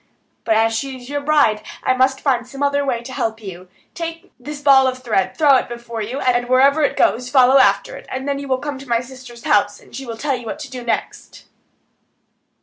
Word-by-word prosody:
But 225 - +2
as 225 +1 +2
she 265 +3 -4
is 245 0 -13
your 285 0 -2
bride, 285 -8 +2 0.2
I 255 - +2
must 265 +1 +1
find 250 -4 0
some 275 +2 -5
other 285 0 +1
way 245 -4 -2
to 260 +2 -9
help 225 -2 -2
you. 185 -3 -10 0.2
Take 330 +2 -7
this 295 +3 -7
ball 275 -2 +5
of 255 0 -2
thread, 215 -6 0
throw 295 -4 +5
it - - -3
before 235 -1 -6
you, 240 +6 -4
and 245 -2 0
wherever 275 +4 +4
it 290 - +1
goes 245 +2 +1
follow 260 0 +5
after 200 -5 +2
it; - - -14
you 280 +2 -3
will 260 -1 +1
then 260 - -12
come 290 -2 -4
to 270 -2 -12
my 235 0 +2
sister's 250 -2 -12
house, 205 0 +2
and - - -16
she 265 +1 -7
will 230 -1 -6
tell 275 +2 -1
you 240 -2 -8
what - - -4
to 290 -4 -9
do 250 -2 -7
next." 235 - -4
255 Hz, 230 wpm, -19 LUFS, 235-280 Hz, 0.2 s, ball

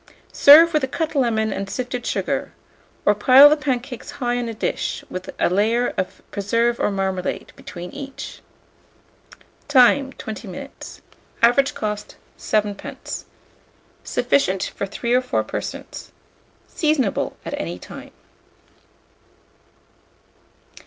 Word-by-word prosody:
Serve 325 +4 +8
with 305 -2 +2
a - - +1
cut 315 +4 -3
lemon 220 -6 +1
and 195 0 -4
sifted 250 +1 -4
sugar, - - -2 0.5
or 205 - +5
pile 255 +7 +8
the - - +5
pancakes 260 -4 -4
high 245 -1 -1
on 240 -1 -3
a - - -4
dish, - - -3
with 185 - -6
a - - +3
layer 220 +7 +1
of 185 - -5
preserve 230 +4 0
or - - +1
marmalade 190 -2 -3
between 180 -1 -9
each. 275 -1 -8 1.3
Time. 270 0 +5
20 220 0 -8
minutes. 275 +9 -9 0.4
Average 275 +5 +4
cost, 210 -1 -4 0.2
7d. 210 -2 -3 0.8
Sufficient 190 -9 0
for 200 - -3
3 235 +4 -2
or 250 - +4
4 250 - -1
persons. - - -7 0.6
Seasonable 300 - 0
at - - -5
any 85 +1 -5
time. - - -11
240 Hz, 120 wpm, -21 LUFS, 200-270 Hz, 1.3 s, Serve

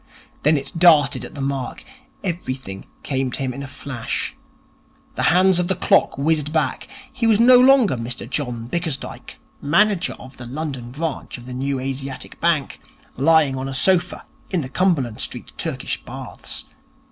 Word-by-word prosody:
Then 150 +1 +4
it 135 0 -5
darted 155 -5 +5
at - - -9
the 140 - -5
mark. 135 -2 -3 0.4
Everything 130 - -4 0.2
came 135 -2 -1
to - - -2
him 130 -2 -2
in 140 - -7
a 140 - -6
flash. 130 -3 -4 0.8
The - - -3
hands 185 +1 +4
of 175 - 0
the 190 - +1
clock 175 - +3
whizzed 150 +1 +1
back. 160 -1 -1 0.3
He 255 -3 0
was 220 -2 +4
no 245 +1 +8
longer 255 - +6
Mr 120 0 -5
John 125 -4 -3
Bickersdyke, 160 -1 -4 0.2
manager 190 +5 +3
of 130 +1 -13
the 120 - -8
London 135 -3 -5
branch 150 +1 -4
of 120 - -12
the 125 - -7
New 135 +1 -2
Asiatic 135 0 -5
Bank, 165 -5 +1 0.4
lying 150 0 +4
on 130 +1 -3
a 135 - -3
sofa 185 +4 +2 0.2
in 180 -4 0
the 130 - -6
Cumberland 140 - +1
Street - - -5
Turkish - - -3
Baths. - - -6
140 Hz, 165 wpm, -21 LUFS, 130-175 Hz, 0.8 s, no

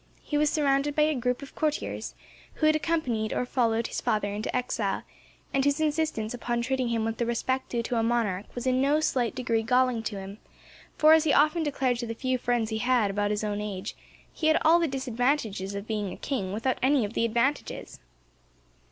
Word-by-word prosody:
He 295 - -4
was 295 0 +3
surrounded 285 -1 +1
by 300 - +4
a 310 +1 +2
group 250 0 -1
of 275 - -11
courtiers, 305 -1 -2 0.4
who 310 - 0
had 310 0 +5
accompanied 260 -10 -1
or - - 0
followed 235 -2 +1
his - - -3
father 205 -1 0
into 210 +1 -3
exile, 235 -5 -1 0.5
and 270 - +2
whose 285 +2 +2
insistence 305 -8 0
upon 240 -1 -2
treating 260 0 0
him 230 -1 0
with 225 0 -2
the 235 - +1
respect 260 +3 -1
due 235 -1 -1
to 240 - -2
a - - +2
monarch 225 -5 0
was 245 - -4
in 255 0 +2
no 285 +3 +3
slight 255 -6 0
degree 235 -3 0
galling 250 0 +2
to 215 -3 -4
him, 195 +2 -9 0.6
for, 310 +1 +7
as 320 -1 +5
he 290 - +3
often 305 +3 +4
declared 265 -5 0
to 240 - -3
the 230 - -4
few 255 +1 -1
friends 240 -2 0
he 220 - -1
had 240 -4 +2
about 205 +1 0
his 210 +1 -1
own 210 -1 -2
age, 205 -1 -5 0.4
he 315 - -1
had 315 - +5
all 330 +2 +6
the 335 - +1
disadvantages 245 -6 -1
of 200 0 -5
being 210 -3 -2
a - - -8
king, 200 -10 -3
without 230 +6 -1
any 265 -3 +3
of 205 - -7
the - - 0
advantages. 235 +5 -1
245 Hz, 215 wpm, -27 LUFS, 220-280 Hz, 0.6 s, for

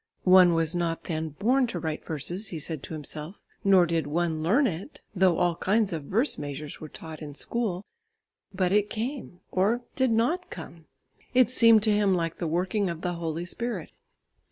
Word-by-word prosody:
One 180 -2 +7
was 165 0 +1
not 170 -2 -1
then 160 -1 -3
born 245 - +2
to 210 - -4
write 160 -2 -4
verses, 170 +7 -4
he 170 - -5
said 155 -1 -3
to 160 - -7
himself, 155 +4 -6 0.2
nor 190 -3 +6
did 165 -3 -1
one 160 +1 -1
learn 220 - +3
it, 190 - -4
though 185 -3 +4
all 175 -1 +2
kinds 205 +2 +1
of 155 -3 -4
verse 230 - 0
measures 145 +1 -6
were 155 - -7
taught 160 +1 -9
in 145 -2 -8
school, 205 -1 -3 0.7
but 185 -2 0
it 205 +1 +3
came, 225 -5 -5
or 210 +6 +2
did 260 -1 +2
not 245 +11 +1
come. 165 -1 -10 0.5
It 250 -2 +5
seemed 230 -4 +6
to 215 - +3
him 205 -2 +3
like 165 -2 -2
the 170 - -1
working 185 +4 0
of 170 -1 -5
the 180 -1 -1
Holy 170 0 -3
Spirit. 220 -2 -3
180 Hz, 185 wpm, -27 LUFS, 160-210 Hz, 0.7 s, One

